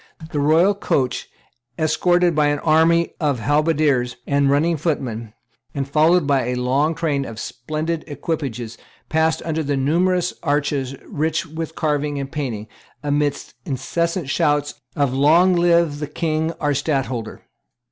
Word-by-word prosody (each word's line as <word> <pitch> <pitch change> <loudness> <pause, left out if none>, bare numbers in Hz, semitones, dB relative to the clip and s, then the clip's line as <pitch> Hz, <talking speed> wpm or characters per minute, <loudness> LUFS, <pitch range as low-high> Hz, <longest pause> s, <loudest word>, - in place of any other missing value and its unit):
The 145 - -1
royal 160 +7 +4
coach, 135 -10 -1 0.5
escorted 175 +2 +2
by 150 -1 +3
an 145 0 +1
army 165 +2 +3
of 145 -4 +1
halberdiers 145 -2 +1
and 140 -1 +2
running 155 +4 +2
footmen, 120 -8 -3 0.4
and 135 -1 -2
followed 155 +4 +3
by 140 -3 +2
a 125 - -1
long 135 +6 +1
train 145 -4 0
of 115 -4 -8
splendid 155 +8 -4
equipages, 135 -6 -4 0.3
passed 160 0 +1
under 160 -1 -1
numerous 175 +6 +1
arches 145 -3 -1
rich 160 +3 -1
with 160 0 -6
carving 150 -1 -1
and 140 -1 -4
painting, 120 -8 -4 0.4
amidst 145 0 -1
incessant 165 +5 -2
shouts 145 -1 +1 0.2
of 140 -3 +1
"Long 165 +7 +4
live 170 -3 +3
the 150 - -3
King 160 +1 -1
our 145 -3 -1
Stadtholder." 135 -5 -2
150 Hz, 135 wpm, -21 LUFS, 140-165 Hz, 0.5 s, royal